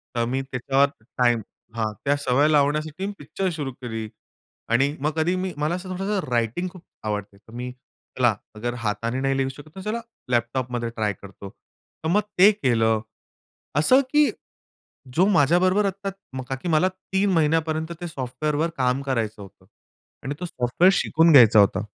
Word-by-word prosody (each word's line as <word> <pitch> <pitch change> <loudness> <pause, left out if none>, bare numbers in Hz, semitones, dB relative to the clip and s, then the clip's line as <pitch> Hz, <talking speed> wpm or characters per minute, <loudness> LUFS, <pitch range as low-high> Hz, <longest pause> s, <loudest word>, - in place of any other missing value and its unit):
तर 120 0 +1
मी 130 +3 -1
त्याच्यावर 135 +1 +1 0.3
टाईम 120 -2 +3 0.3
हां, 110 -2 -1
त्या 140 +1 +3
सवय 145 +1 +2
लावण्यासाठी 150 +4 +1
मी 205 - -4
पिक्चर 195 -1 -3
सुरू 140 -3 -3
केली 115 -3 -5 0.6
आणि 135 +5 +2
मग 150 - +1
कधी 165 +3 +1
मी 185 0 -3
मला 150 +3 0
असं 185 +1 -7
थोडंसं 195 +3 -1
रायटिंग 120 +9 0
खूप 180 -2 -14 0.2
आवडते. 105 -2 -4
तर 110 +3 -19
मी 125 +1 -5 0.5
चला - - +3 0.2
अगर 120 +3 -3
हाताने 115 +2 -2
नाही 135 0 +1
लिहू 135 0 0
शकत, 145 +3 -11
तर 190 - -7
चला 215 +4 -3 0.3
लॅपटॉपमध्ये 120 0 -1
ट्राय 105 -2 0
करतो. 100 0 -10
तर 160 - -10
मग 205 +5 +4 0.2
ते 200 +3 +9
केलं, 115 - +1 0.8
असं 255 - +5
की 295 0 +5 0.9
जो 180 - +5
माझ्याबरोबर 185 +3 +3
आता 195 +1 -2 0.4
का 135 - -1
की, 130 - -7
मला 165 +3 +4
3 190 +1 -1
महिन्यापर्यंत 160 0 +1
ते 175 - -3
सॉफ्टवेअरवर 150 +3 -2
काम 130 0 +1
करायचं 115 -6 -2
होतं 95 -3 -14 0.6
आणि 135 +3 -3
तो 180 - -4
सॉफ्टवेअर 165 +4 +2
शिकून 165 +1 +3
घ्यायचा 120 -7 +8
होता. 100 0 +4
140 Hz, 165 wpm, -24 LUFS, 120-175 Hz, 0.9 s, ते